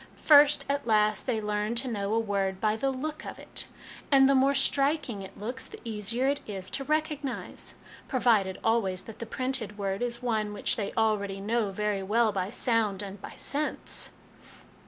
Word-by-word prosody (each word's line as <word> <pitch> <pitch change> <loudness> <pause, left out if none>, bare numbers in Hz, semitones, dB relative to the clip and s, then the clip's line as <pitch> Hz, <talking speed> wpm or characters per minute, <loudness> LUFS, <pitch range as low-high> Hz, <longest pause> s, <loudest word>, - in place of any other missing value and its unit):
First, 295 -1 +7
as 280 0 +1
last, 215 -2 +2
they 235 -4 +1
learn 210 +1 -1
to 250 +3 +1
know 205 -4 -2
a - - +3
word 195 -3 -1
by 215 +1 +2
the 270 +5 0
look 300 +4 -4
of - - -7
it, - - -1 0.4
and 270 -1 +7
the 275 - +4
more 270 +1 +4
striking 275 -5 +1
it 190 - -10
looks 245 +6 -4
the - - -11
easier 225 +3 -1
it 285 +1 +1
is 190 -3 -5
to 275 - -2
recognise; 300 -2 -3 0.3
provided 220 -8 +2
always 200 -5 +1
that 225 - -11
the 230 - -5
printed 255 -4 -2
word 195 0 -2
is 240 0 -3
one 215 -3 0
which 205 - +1
they 205 -3 -3
already 205 -3 +1
know 215 +1 0
very 205 0 -1
well 220 +3 +2
by 190 -1 -2
sound 220 -4 +1
and 200 0 -8
by - - -9
sense." 295 +2 -2
225 Hz, 180 wpm, -28 LUFS, 205-260 Hz, 0.4 s, First